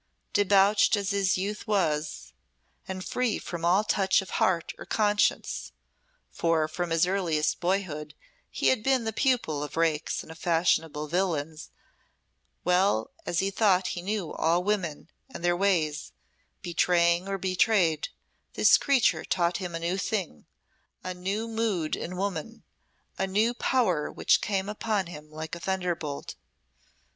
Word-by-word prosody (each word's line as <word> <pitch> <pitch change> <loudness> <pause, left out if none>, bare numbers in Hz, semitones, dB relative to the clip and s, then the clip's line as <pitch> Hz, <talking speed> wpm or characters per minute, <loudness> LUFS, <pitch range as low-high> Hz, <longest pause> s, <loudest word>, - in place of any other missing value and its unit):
Debauched 205 +1 +4
as 200 -1 -2
his 195 -1 +1
youth 205 +4 -4
was, 155 -7 -1 0.5
and 185 -1 -5
free 250 -3 0
from 170 -2 -6
all 180 +5 +4
touch 195 -2 +2
of 190 - -12
heart 170 -3 +1
or - - -6
conscience 210 -1 0 0.6
for 165 -2 +1
from 175 +2 -3
his 165 +1 +3
earliest 175 -5 0
boyhood 175 -5 -2 0.3
he - - +1
had 260 - +2
been 265 +1 +2
the 220 0 -3
pupil 235 - +1
of 150 +2 -6
rakes 165 -2 0
and 160 - -11
fashionable 160 -3 +1
villains 160 -3 -2 0.9
well 180 - +2 0.2
as 175 - +1
he 195 +1 -1
thought 190 -3 +2
he 175 - -5
knew 200 -2 -3
all 170 +2 +1
women 185 -8 -2 0.2
and 255 - -9
their 175 0 +3
ways, 170 -6 0 0.5
betraying 170 0 +2
or 195 0 -2
betrayed 185 -4 +2 0.4
this - - +5
creature 275 -4 +2
taught 175 -1 0
him 180 -3 -5
a - - -3
new 175 +3 -1
thing, 185 - -3 0.6
a 185 - -4
new 195 +5 -3
mood 220 -8 -1
in 180 +1 -6
woman, 200 +3 -4 0.6
a 195 - +1
new 215 +5 +2
power 200 - +1
which - - +2
came 195 -1 -1
upon 210 -1 -1
him 150 -3 -10
like 155 +1 -7
a 170 - -4
thunderbolt. 175 -6 -3
180 Hz, 145 wpm, -27 LUFS, 165-200 Hz, 0.9 s, this